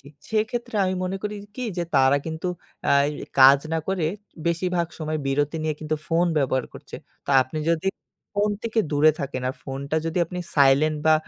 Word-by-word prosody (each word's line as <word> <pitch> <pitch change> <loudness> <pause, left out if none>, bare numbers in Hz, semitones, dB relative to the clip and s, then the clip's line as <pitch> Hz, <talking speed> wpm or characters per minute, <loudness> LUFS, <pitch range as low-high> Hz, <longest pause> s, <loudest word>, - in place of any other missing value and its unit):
জি 140 - -21 0.3
সেক্ষেত্রে 225 +2 -1
আমি 185 0 0
মনে 190 +1 -2
করি 210 0 -3 0.2
কি 255 - -4 0.2
যে - - +1
তারা 135 +1 +5
কিন্তু 160 +2 -4 0.4
আয় 140 0 +4 0.3
কাজ 135 +1 +9
না 165 - +2
করে 190 -4 0 0.4
বেশিরভাগ 175 0 0
সময় 155 -1 -2
বিরতি 145 +3 0
নিয়ে 155 -1 -1
কিন্তু 155 0 -1
ফোন 170 +1 +3
ব্যবহার 130 -2 +1
করছে। - - -9 0.3
তা - - -2
আপনি 130 +5 -6
যদি 170 +2 0 0.5
ফোন 205 +1 +2
থেকে 230 -1 -2
দূরে 150 +2 +5
থাকেন। 130 -2 -4
আর 130 - -3
ফোনটা 140 +3 -4
যদি 165 +2 -1
আপনি 180 - -6 0.2
সাইলেন্ট 145 +2 +4
বা 155 - +7
155 Hz, 180 wpm, -24 LUFS, 140-180 Hz, 0.5 s, কাজ